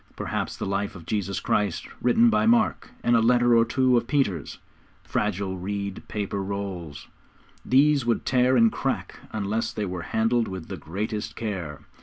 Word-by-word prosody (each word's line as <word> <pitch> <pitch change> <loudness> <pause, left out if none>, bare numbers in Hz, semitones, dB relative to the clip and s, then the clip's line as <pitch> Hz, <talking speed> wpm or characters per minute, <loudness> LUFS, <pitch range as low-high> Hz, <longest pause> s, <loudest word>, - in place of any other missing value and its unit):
Perhaps - - -3
the - - -3
life 100 +1 -2
of 85 -3 -11
Jesus 100 -2 -2
Christ, 100 -5 0 0.2
written 230 - +4
by - - +2
Mark, 235 +1 +2
and 120 - +4
a - - +5
letter 120 +1 +4
or 115 - +6
two 125 +1 +2
of 120 - -1
Peter's; 125 - 0 0.5
fragile, 95 -2 -2
reed 100 +1 -4
paper 100 -1 -3
rolls, 95 -6 -5 0.6
which 140 +1 +4
would 115 - +1
tear 130 0 +3
and 115 -1 +5
crack - - -3
unless 110 +1 -1
they 105 - -3
were 90 -2 -4
handled 115 +1 +2
with 95 -4 -7
the - - -4
greatest 105 +5 -4
care. 90 -10 -4
105 Hz, 165 wpm, -25 LUFS, 95-120 Hz, 0.6 s, or